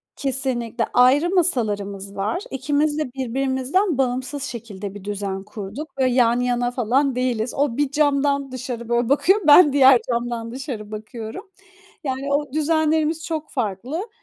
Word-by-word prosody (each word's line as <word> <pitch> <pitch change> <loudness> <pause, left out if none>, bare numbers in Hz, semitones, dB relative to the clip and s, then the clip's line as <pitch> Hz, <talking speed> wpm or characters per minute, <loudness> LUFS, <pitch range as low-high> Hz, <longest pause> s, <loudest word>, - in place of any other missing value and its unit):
Kesinlikle. 250 -4 -1
Ayrı 270 +7 +5
masalarımız 205 - 0
var. 210 - -2
İkimiz 290 +3 0
de 265 -5 -3
birbirimizden 270 - 0
bağımsız 260 +2 -1
şekilde 210 -6 -7
bir 200 - -9
düzen 200 -1 -4
kurduk. 225 +10 -8
Böyle, 255 -2 +2
yan 240 -1 +3
yana 245 0 0
falan 255 +3 +1
değiliz. 250 -2 -1
O 275 -3 0
bir 290 -2 0
camdan 280 -2 +1
dışarı, 245 -2 -6
böyle, 240 0 +1
bakıyor, 380 +9 +3
ben 295 -1 +8
diğer 265 -3 +7
camdan 235 -1 -2
dışarı 240 -5 -6
bakıyorum. 220 - -8 0.5
Yani, 275 +1 -2
o 290 -1 -1
düzenlerimiz 315 +1 +1
çok 315 -2 -4
farklı. 250 - -3
260 Hz, 140 wpm, -22 LUFS, 230-290 Hz, 0.5 s, ben